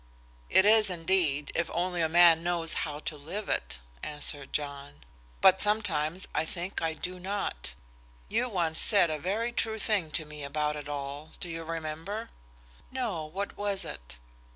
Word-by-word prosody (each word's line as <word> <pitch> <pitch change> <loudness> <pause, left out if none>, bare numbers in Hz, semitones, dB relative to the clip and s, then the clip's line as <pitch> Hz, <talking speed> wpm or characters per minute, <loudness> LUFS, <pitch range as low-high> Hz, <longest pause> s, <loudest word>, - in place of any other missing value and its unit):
"It 190 - +6
is, 215 -1 +6
indeed, 165 -5 +1
if 170 0 0
only 175 0 0
a 160 - +2
man 170 -1 +7
knows 170 -1 +1 0.2
how 145 - -5
to 155 - -3
live 180 +9 -5
it," - - -1 0.2
answered 150 -2 -2
John. 140 - -4 0.4
"But 190 0 +7
sometimes 185 -5 +2
I 155 - +2
think 175 +3 -4
I 160 -1 0
do 180 +3 -5
not. 190 - -3 0.5
You 250 - +1
once 170 -6 +1
said 200 -6 +5
a 155 - -2
very 215 +9 -1
true 220 -2 -1
thing 205 -6 +1
to 155 - +1
me 150 -1 -8
about 150 +1 -1
it 145 -1 -7
all. 145 +1 -5
Do 175 - -4
you 165 0 -4
remember?" 165 +7 -5 0.6
"No; 225 -12 -2
what 190 +6 -4
was 200 -1 -1
it?" - - -8
165 Hz, 165 wpm, -29 LUFS, 150-195 Hz, 0.6 s, man